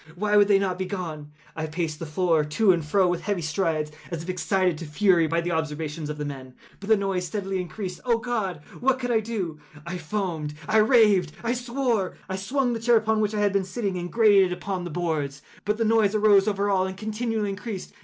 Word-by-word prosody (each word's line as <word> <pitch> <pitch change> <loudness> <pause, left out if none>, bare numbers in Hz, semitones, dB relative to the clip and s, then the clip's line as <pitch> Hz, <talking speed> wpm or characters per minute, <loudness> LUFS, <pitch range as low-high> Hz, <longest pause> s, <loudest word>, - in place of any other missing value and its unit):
Why 210 +3 0
would 205 -1 +6
they 200 -1 +5
not 190 -2 -1
be 185 - -2
gone? 160 -6 -5 0.2
I 160 0 -3
paced 155 -1 -3
the 165 - -5
floor 165 0 +2
to 190 +8 +3
and 170 -3 0
fro 185 +5 +2
with 175 -1 -1
heavy 195 -2 -2
strides, 155 -1 -1 0.2
as 165 -2 -4
if 175 - -8
excited 185 -1 +1
to 165 - -6
fury 170 +1 +3
by 165 +1 0
the 175 +1 -2
observations 155 -1 -3
of 150 - -4
the 150 - -3
men—but 135 +8 -10
the 220 - +6
noise 190 -2 -1
steadily 195 0 -2
increased. 180 +1 -6
Oh 235 -2 +2
God! 220 -9 -3 0.2
what 260 +1 +2
could 245 -1 -3
I 225 - +4
do? 200 -8 -4 0.3
I 175 +1 -5
foamed—I 165 -1 -2
raved—I 215 - +3
swore! 245 -5 -1
I 190 - -3
swung 245 +6 0
the 230 - -3
chair 235 +1 +4
upon 220 0 +1
which 215 0 0
I 210 - 0
had 205 -1 +2
been 200 -1 +2
sitting, 195 0 -3
and 175 0 -4
grated 210 -4 +5
it - - -1
upon 185 -1 -4
the - - -4
boards, 150 -4 -2 0.2
but 210 +2 0
the 225 - +1
noise 220 -2 +3
arose 205 -2 +5
over 200 -1 0
all 190 -2 +2
and 190 0 -7
continually 220 0 -2
increased. 200 -1 -6
190 Hz, 220 wpm, -25 LUFS, 165-215 Hz, 0.3 s, would